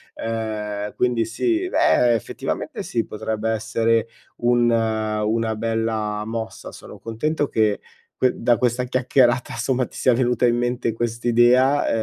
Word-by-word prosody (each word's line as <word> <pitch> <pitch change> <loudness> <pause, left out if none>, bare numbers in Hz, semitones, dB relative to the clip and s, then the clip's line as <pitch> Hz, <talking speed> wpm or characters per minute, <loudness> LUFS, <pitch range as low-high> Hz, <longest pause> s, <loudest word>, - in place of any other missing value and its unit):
ehm, 105 -2 -4
quindi 120 -2 +1
sì, 340 - -1
eh, 125 - +3
effettivamente 110 - -4
sì, 115 -2 -2
potrebbe 110 +1 -3
essere 115 +1 0 0.3
un 120 0 +2
una 110 0 0
bella 110 -1 -2
mossa. 110 0 -6
Sono - - -12
contento 145 +6 -2
che 110 -2 +1 0.4
que 130 - +2
da 120 -1 +2
questa 125 +1 0
chiacchierata 125 -1 +2
somma 125 +2 0
ti - - -13
sia 130 - +3
venuta 125 0 +1
in 120 0 +3
mente 120 -2 -1
quest'idea, 120 +4 +2
115 Hz, 130 wpm, -22 LUFS, 110-125 Hz, 0.4 s, eh